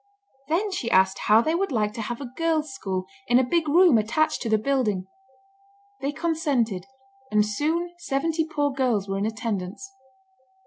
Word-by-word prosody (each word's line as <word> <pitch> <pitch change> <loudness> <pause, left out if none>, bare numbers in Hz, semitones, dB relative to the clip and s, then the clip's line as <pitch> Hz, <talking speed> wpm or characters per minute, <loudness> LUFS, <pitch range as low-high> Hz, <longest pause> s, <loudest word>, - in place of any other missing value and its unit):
Then 375 +7 0
she 255 -11 -2
asked 190 -1 +3
how 215 +2 +7
they 315 +7 0
would 380 0 0
like 210 -4 0
to 230 - -5
have 235 +2 -4
a 265 -4 -7
girls' 315 -4 0
school 190 -7 -3 0.2
in 245 - +5
a 260 - +4
big 315 +4 0
room 335 -6 +6
attached 310 +9 0
to 230 - -2
the 220 - +4
building. 215 -6 0 0.9
They 275 +1 -2
consented, 285 - -1 0.4
and 210 0 +3
soon 320 +11 -1
seventy 320 0 0
poor 290 -2 0
girls 245 -7 0
were 195 0 -2
in 205 - 0
attendance. 220 +2 -4
260 Hz, 170 wpm, -25 LUFS, 210-315 Hz, 0.9 s, how